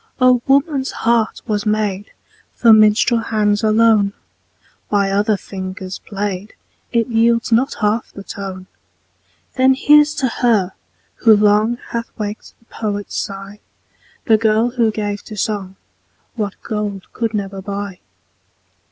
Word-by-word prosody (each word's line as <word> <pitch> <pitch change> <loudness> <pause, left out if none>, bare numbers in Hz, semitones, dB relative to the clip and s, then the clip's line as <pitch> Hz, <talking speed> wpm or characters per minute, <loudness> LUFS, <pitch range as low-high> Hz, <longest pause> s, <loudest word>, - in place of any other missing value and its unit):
Oh! 255 -1 +4
woman's 275 0 +2 0.2
heart 230 -1 +1
was 210 -3 -1
made 210 -2 -1 0.4
For 230 -2 +6
minstrel 215 +2 +4
hands 210 -2 0
alone; 215 -2 +3 0.8
By 200 -1 +1
other 205 +1 +1
fingers 185 -1 -7
played, 200 0 -5 0.4
It 235 -1 +2
yields 230 0 +1
not 250 +5 +2
half 215 +2 0
the 200 - -10
tone. 190 -2 -7 0.9
Then 260 +1 +4
here's 295 +2 +5
to 270 - 0
her, 225 -6 +1 0.5
who 220 -2 +5
long 210 +3 +3
Hath 235 0 -4
waked 210 0 -6
the 230 - -31
poet's 205 -3 -5
sigh, 195 +1 -5 0.7
The 220 -2 +5
girl 220 +2 +2
who 235 -3 +1
gave 205 -1 -3
to 215 - -9
song 195 -3 -3 0.6
What 210 -4 -3
gold 210 -3 -4
could 225 -2 -2
never 195 -1 -4
buy. 200 -1 -5
215 Hz, 130 wpm, -18 LUFS, 200-230 Hz, 0.9 s, For